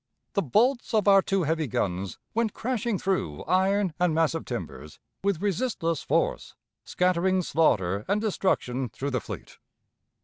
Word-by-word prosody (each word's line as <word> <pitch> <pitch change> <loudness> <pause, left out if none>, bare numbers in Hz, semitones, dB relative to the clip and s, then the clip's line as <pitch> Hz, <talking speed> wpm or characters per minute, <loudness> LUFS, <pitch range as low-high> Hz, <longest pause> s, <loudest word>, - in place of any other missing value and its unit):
The 200 - +2
bolts 240 - +2
of 210 -2 +2
our 195 -1 +7
two 195 -1 0
heavy 160 0 0
guns 95 -4 -2 0.2
went 225 -2 0
crashing 235 -3 -1
through 170 - -2
iron 190 0 +2
and 175 -3 +2
massive 165 0 +1
timbers 75 - -6 0.3
with 200 -2 0
resistless 190 - -1
force, - - -1 0.3
scattering 185 +1 +1
slaughter 100 - +1
and 200 +1 +1
destruction 135 - 0
through 135 +6 -4
the 125 -3 -1
fleet. - - -9
180 Hz, 140 wpm, -27 LUFS, 140-200 Hz, 0.3 s, our